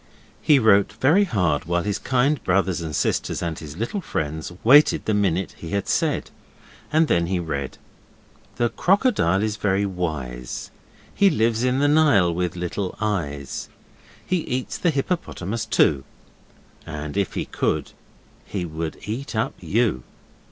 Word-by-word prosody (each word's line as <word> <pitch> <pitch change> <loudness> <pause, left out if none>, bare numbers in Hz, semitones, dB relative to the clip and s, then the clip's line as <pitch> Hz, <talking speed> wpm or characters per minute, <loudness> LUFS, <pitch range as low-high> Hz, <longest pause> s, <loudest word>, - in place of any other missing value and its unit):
He 150 - +5
wrote 100 -5 +4
very 145 - +3
hard 90 - 0
while 85 0 0
his 105 0 -2
kind 135 +3 +1
brothers 95 -1 +1
and 80 -3 -4
sisters - - -1
and 85 -2 -3
his 75 0 -9
little 120 - -2
friends 80 - -3
waited 145 +6 +6
the 110 - +1
minute 95 -3 0
he 80 - -7
had 100 -1 -1
said, - - 0 0.6
and 160 +1 +4
then 85 -7 +2
he 95 +1 0
read: 70 -5 -4 0.8
'The 120 -1 +1
crocodile 185 - +2
is 110 -1 -1
very 100 -1 +1
wise, 75 -10 -4 0.4
He 200 -1 +4
lives 115 - +1
in 125 0 +2
the 145 +1 +3
Nile 145 - +4
with 90 +1 -2
little 90 +2 -3
eyes, 75 -11 -3 0.6
He 185 - +1
eats 130 -6 -3
the 175 - +2
hippopotamus 135 - -2
too, 70 -2 +3 0.8
And 75 -1 -6
if 100 -1 -1
he - - -2
could - - -1 0.5
he 95 -4 -4
would 80 0 -5
eat 115 +5 -5
up 110 - 0
you. 110 - 0
100 Hz, 150 wpm, -23 LUFS, 85-125 Hz, 0.8 s, waited